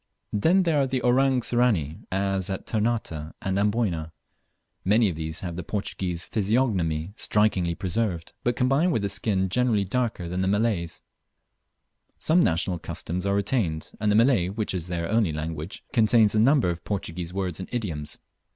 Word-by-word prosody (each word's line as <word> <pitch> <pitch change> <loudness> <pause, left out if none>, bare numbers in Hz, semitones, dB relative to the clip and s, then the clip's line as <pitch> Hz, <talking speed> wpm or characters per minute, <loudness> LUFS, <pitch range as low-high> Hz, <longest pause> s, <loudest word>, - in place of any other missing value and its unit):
Then 170 - +3
there 160 -5 +2
are 135 - +1
the 130 -1 -2
"Orang 130 +1 +3
Sirani," 110 - +1
as 95 0 0
at 95 - -4
Ternate 115 -1 0 0.3
and 95 0 -1
Amboyna. 100 -7 0 0.7
Many 105 +2 +4
of 85 - -4
these 80 0 -4
have 85 -3 -5
the 90 - -5
Portuguese 90 -3 -3
physiognomy 100 -7 0
strikingly 95 -7 +1
preserved, 90 -2 -2
but 120 0 +1
combined 135 +8 +2
with 105 -6 0
a - - -1
skin 100 -1 0
generally 115 0 +2
darker 110 -4 -1
than 90 +2 -2
the 95 - +1
Malays. 100 -4 0 1.1
Some 165 +3 +3
national 85 - +1
customs 90 +4 -4
are 100 - +2
retained, 100 -6 -1
and 105 0 +1
the - - +3
Malay, 115 -5 +4
which 105 +1 -2
is 90 -2 -2
their 85 -1 -2
only 110 -4 +2
language, 80 +2 -5
contains 110 -2 +4
a 110 - +2
large 110 - +5
number 135 -9 +4
of 85 - -7
Portuguese 90 -4 -4
words 95 -2 -3
and 95 - -6
idioms. 80 -11 -3
100 Hz, 170 wpm, -26 LUFS, 85-115 Hz, 1.1 s, large